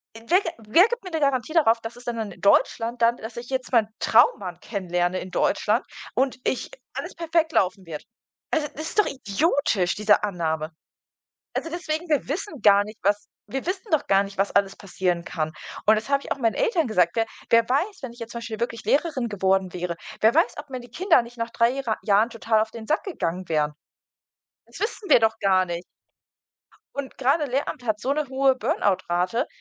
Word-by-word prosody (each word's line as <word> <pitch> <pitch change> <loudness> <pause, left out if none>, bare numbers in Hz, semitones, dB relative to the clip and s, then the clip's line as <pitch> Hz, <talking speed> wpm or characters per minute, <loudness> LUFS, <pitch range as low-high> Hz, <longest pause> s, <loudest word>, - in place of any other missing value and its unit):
n 225 0 -12
wer 365 +4 +5
g 335 - -3 0.2
wer 345 - +6
gibt 480 -3 -3
mir 370 - -7
'ne 320 - -1
Garantie 275 +2 +1
darauf, 240 -9 +4
dass 225 +1 -7
es 245 - -13
dann 225 -4 -3
in - - -14
Deutschland 230 +4 +2
dann 235 +1 +4
dass 225 +1 -9
ich 240 +2 -7
jetzt 260 -1 -3
meinen 230 -4 +4
Traummann 190 -6 +3
kennenlerne 180 -3 -1
in 185 - -8
Deutschland 215 +5 +1 0.3
und 265 0 +1
ich 260 - -1 0.2
alles - - -6
perfekt 330 -1 0
laufen 185 0 +1
wird? 155 -3 -7 0.5
Also, 305 -2 +1
das 310 - -5
ist - - -1
doch - - +6
idiotisch, 240 - 0
diese 210 0 +3
Annahme. 160 -5 -2 0.8
Also 330 - -3
deswegen, 330 0 -3
wir 295 -5 +1
wissen 310 - -4
gar 200 -1 +6
nicht, 215 +1 -11
was 205 +1 +1 0.2
wir 265 +5 -4
wissen 370 +3 -4
doch 315 - +2
gar 195 0 +4
nicht, 200 0 -10
was 195 +1 +1
alles 200 -1 +2
passieren 180 -3 -2
kann. 155 -2 -3 0.3
Und 215 +1 +6
das 220 +5 -4
habe 280 0 +2
ich - - -10
auch - - 0
meinen 230 -4 +1
Eltern 450 - +1
gesagt, 180 -6 +3
wer 225 - +3 0.2
wer 230 0 +5
weiß, 365 +10 0
wenn 255 -3 -6
ich 240 - -16
jetzt 230 0 -7
zum 235 - -5
Beispiel 225 -2 -6
wirklich 230 -1 -3
Lehrerin 280 -5 +1
geworden 190 -2 +1
wäre, 175 -1 -3 0.3
wer 220 +2 +5
weiß, 240 - +3
ob 295 -1 -8
mir 255 -1 -5
die 240 0 -13
Kinder 340 - +3
nicht 235 +1 -12
nach 230 0 -2
3 230 +1 +2
Jehre 255 -5 -2
Jahren 210 +2 +3
total 225 -1 +1
auf 220 0 -2
den 220 -1 -9
Sack 310 - +1
gegangen 185 - -3
wären? 150 -2 +1 0.9
Das - - -13
wissen 425 -1 -3
wir - - +7
doch 225 0 +2
gar 185 -1 +3
nicht. 175 0 -4 1.1
Und 280 -1 -6
gerade 280 +4 +2
Lehramt 260 -1 -3
hat 215 -2 0
so 260 - -1
'ne 300 0 -2
hohe 265 0 +3
Burn-out-Rate. 185 - 0
230 Hz, 210 wpm, -24 LUFS, 200-275 Hz, 1.1 s, wir